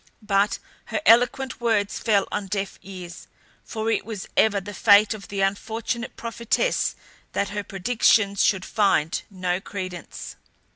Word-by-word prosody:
But 200 0 +2 0.3
her - - -2
eloquent 250 +2 +4
words 220 -4 +1
fell 205 -3 +2
on 200 - -3
deaf 195 0 -3
ears; 180 -3 -9 0.4
for 220 0 -2
it - - 0
was 215 -3 -6
ever 210 -2 +4
the 205 +1 -8
fate 205 +2 +5
of 210 -2 -9
the 200 -1 -3
unfortunate 220 +4 -2
prophetess 235 - 0 0.4
that 200 - 0
her 205 0 -3
predictions 200 0 +2
should 190 -2 +2
find 195 -7 +1
no 185 -2 -2
credence. 185 -4 -7
205 Hz, 140 wpm, -24 LUFS, 195-225 Hz, 0.4 s, fate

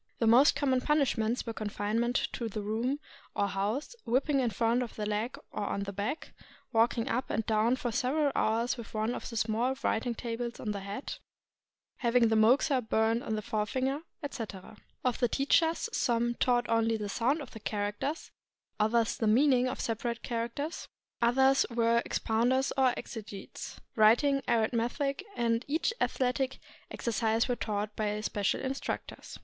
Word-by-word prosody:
The 230 - +1
most 245 +6 +6
common 265 -3 +1
punishments 250 -6 +1
were 230 - -4
confinement 215 +3 -1 0.2
to 230 -2 -3
the 210 0 -4
room 230 +7 -1 0.4
or 200 - +1
house, 205 - -2
whipping 270 +4 +2
on 250 - +1
the 225 - -3
front 230 +2 +2
of 240 - -5
the 210 - -3
leg 210 +4 -2
or 210 - -3
on 200 - -2
the 200 0 -5
back, 210 +11 -4 0.4
walking 230 +1 +2
up 250 +2 -1
and 220 0 -1
down 220 +3 +2
for 245 -2 -3
several 280 +5 +1
hours 230 +4 +1
with 230 -2 -9
one 215 +2 0
of - - -5
the 230 - -5
small 230 +4 +1
writing 235 +1 0
tables 235 0 -4
on 215 - -2
the 200 - -3
head, 200 +7 -6 0.8
having 235 -2 +3
the 220 - +2
moxa 255 +5 +4
burned 220 +1 +1
on 220 - -2
the 215 - -3
forefinger, 255 +7 -1 0.2
etc. 220 -8 -6 0.3
Of 250 -2 +1
the 245 - +3
teachers, 320 - +2
some 240 -1 +1
taught 240 0 +1
only 225 0 +2
the 210 -1 -4
sound 245 +9 +1
of 280 -4 -8
the 220 - -9
characters, 210 +9 -3 0.5
others 225 +1 +2
the 225 - 0
mean 265 +6 +5
ing 250 0 +3
of 255 - -3
the - - -4
separate 235 +1 -2
characters, 235 +7 -3 0.3
others 265 +3 +4
were 235 0 +2
expounders 245 +4 +1
or 265 -2 +4
exegetes. 205 -3 -8 0.2
Writing, 245 +6 +5
arithmetic, 240 - 0
and 230 0 +1
each 320 +9 0
athletic 260 +1 0 0.3
exercise 225 -1 0
were 245 - 0
taught 210 -2 -3
by 210 -1 -1
special 205 -2 0
instructors. 270 +1 -5
235 Hz, 165 wpm, -30 LUFS, 220-260 Hz, 0.8 s, most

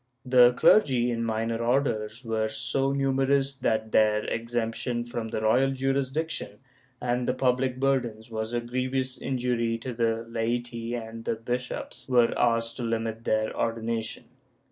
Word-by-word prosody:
The 125 -1 +6
clergy 125 - +4
in 115 0 -1
minor 115 0 -1
orders 120 -2 0
were 110 -1 0
so 135 +4 -1
numerous 135 0 +1
that 110 -4 0
their 105 0 +3
exemption 120 +1 -2
from 120 -1 -4
the 110 - -3
royal 125 +5 +3
jurisdiction 135 +4 -1 0.4
and 125 0 -1
the 125 - +1
public 130 0 +1
burdens 120 -5 0
was 110 0 -3
a 120 0 -1
grievous 130 +2 -2
injury 120 -3 -1
to 125 +2 -6
the 115 -1 0
laity 120 +1 -2
and 115 -1 -7
the 115 - -1
bishops 125 +3 -4
were 120 -2 +4
asked 115 -1 +1
to 125 - -4
limit 115 -1 -2
their 110 0 0
ordination. 115 -1 -2
120 Hz, 145 wpm, -27 LUFS, 115-130 Hz, 0.4 s, The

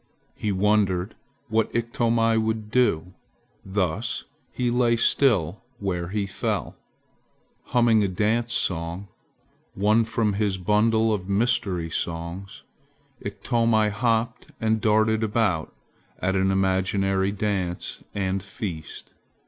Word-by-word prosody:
He 105 - -2
wondered 95 -2 +1 0.3
what 110 0 +1
Iktomi 115 -1 +1
would 110 -1 -1
do, 95 -8 +1 0.5
thus 95 +1 -2 0.3
he 125 -1 -1
lay 120 -1 +3
still 110 - +2 0.2
where 90 -4 -2
he 100 +2 -1
fell. 100 - -3 0.9
Humming 115 -3 +3
a - - +2
dance 110 +5 0
song, 85 -1 -2 0.7
one 105 +3 +3
from 110 -2 0
his 100 -1 0
bundle 110 +4 +2
of 95 -2 -4
mystery 100 -6 +1
songs, 85 +5 -4 0.6
Iktomi 115 -2 +1
hopped 115 +1 0
and 110 -1 +1
darted 110 +1 +3
about 105 -7 0 0.5
at 95 +1 -1
an 95 0 +2
imaginary 95 0 +1
dance 95 -4 -3
and 95 -1 -1
feast. 95 -5 -7
105 Hz, 110 wpm, -25 LUFS, 95-115 Hz, 0.9 s, lay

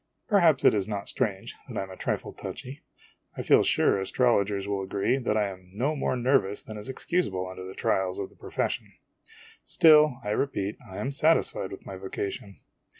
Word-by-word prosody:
Perhaps 170 - +4
it - - +7
is 100 -2 0
not 100 -2 -4
strange 105 -7 -2
that - - -7
I - - -1
am 95 - -9
a - - -8
trifle - - -3
touchy; 135 +4 -8 0.6
I - - -3
feel - - +5
sure - - +2
astrologers 100 -2 +1
will 100 -1 -1
agree 100 +7 0
that 110 -4 0
I 105 -1 +2
am 95 -1 -12
no 140 +8 0
more 135 - -1
nervous 120 -5 +1
than 110 - -9
is 105 +5 -7
excusable 130 - -1
under 95 0 -8
the 95 - -9
trials 95 -1 0
of 100 - -5
the - - -21
profession. - - -3 0.7
Still, 150 -5 +5
I 105 - -2
repeat, 105 -4 -1
I 95 - -8
am 135 - -2
satisfied 145 -9 +2
with 95 - -9
my 95 - -7
vocation. 100 +1 -5
105 Hz, 190 wpm, -27 LUFS, 95-135 Hz, 0.7 s, it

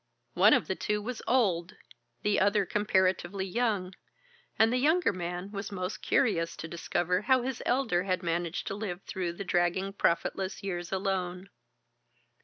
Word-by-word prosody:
One - - +6
of - - 0
the - - -1
two 210 -1 -1
was 230 +3 -5
old, 185 -9 +2 0.5
the 210 - +2
other 200 +1 +3
comparatively 190 -1 +1
young, 200 -3 -1 0.6
and 225 +2 +4
the 250 - +2
younger 315 - +3
man 180 +2 -5
was 200 0 -5
most 185 0 -4
curious 170 -10 +1
to 165 - -6
discover 175 +2 -1
how 255 +2 +3
his 260 -1 -3
elder 240 -9 +2
had 185 -1 -1
managed 170 0 -2
to - - -3
live 195 -3 -5
through 180 -2 -3
the 185 - -6
dragging 175 +3 +1
profitless 190 +1 0
years 175 -3 -4
alone. 190 -1 -2
190 Hz, 155 wpm, -29 LUFS, 175-210 Hz, 0.6 s, One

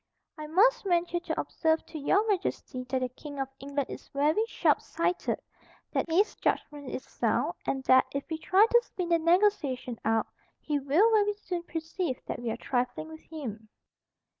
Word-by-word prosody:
"I 305 -1 -7
must 460 +10 +4
venture 350 -2 +1
to 350 - -3
observe 320 -1 0
to 315 - -7
Your 395 +9 +2
Majesty 360 -9 -2
that 260 -1 0
the 255 - -1
King 285 +3 -10
of 270 - -1
England 280 0 -3
is - - -8
very 300 +9 +2
sharpsighted, 355 -5 0 0.5
that - - -1
his 380 +6 +3
judgment 290 -3 -2
is - - -5
sound, - - 0
and 270 -1 -1
that, 260 0 +5
if 280 0 -2
we 320 -1 -4
try 385 +6 +5
to 475 +1 +4
spin 360 -6 -5
the 335 -1 +4
negotiation 325 - +2
out, 225 0 +2 0.3
he 295 -2 -1
will 310 +12 +4
very 415 -1 +3
soon 365 -4 -4
perceive 325 -3 -3
that - - -4
we 240 - -2
are 225 - -2
trifling 250 +5 -2
with 315 0 -10
him." 225 -9 -7
315 Hz, 175 wpm, -29 LUFS, 270-360 Hz, 0.5 s, that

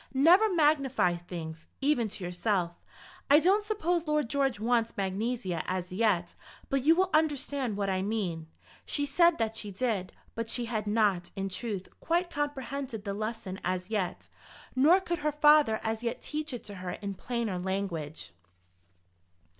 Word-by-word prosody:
Never 360 +10 +6
magnify 280 - +3
things, 170 -2 -8
even 270 -6 +2
to 200 -1 -7
yourself. 180 0 0 0.6
I 290 +2 +8
don't 390 +6 +3
suppose 355 -6 -1
Lord 300 -5 +1
George 270 -6 +1
wants 230 0 +1
magnesia 195 -2 -1
as 180 -1 -3
yet, 185 -4 +1 0.4
but 275 -1 +1
you 320 +3 +6
will 375 +1 +2
understand 285 -7 +1
what 200 -1 -1
I 190 -1 0
mean." 190 -6 -2 0.4
She 290 - -1
said 340 +4 +4
that 225 -1 -1
she 210 -2 -4
did; 200 -2 -2 0.2
but 230 0 -4
she 240 +1 0
had 215 -3 -3
not, 205 -5 +2
in 195 -1 -2
truth, 195 0 -4
quite 345 +2 0
comprehended 275 -5 -3
the 200 - -3
lesson 215 -2 -4
as 185 +2 -2
yet, 190 -5 -2 0.5
nor 310 +8 +6
could 345 -2 -3
her 300 0 0
father 295 -6 +5
as 220 0 -2
yet 235 -1 -2
teach 305 0 -4
it 245 - -6
to 205 - -9
her 180 -1 -4
in 200 -1 -5
plainer 230 -3 -3
language. 175 - -4
225 Hz, 160 wpm, -29 LUFS, 190-290 Hz, 0.6 s, I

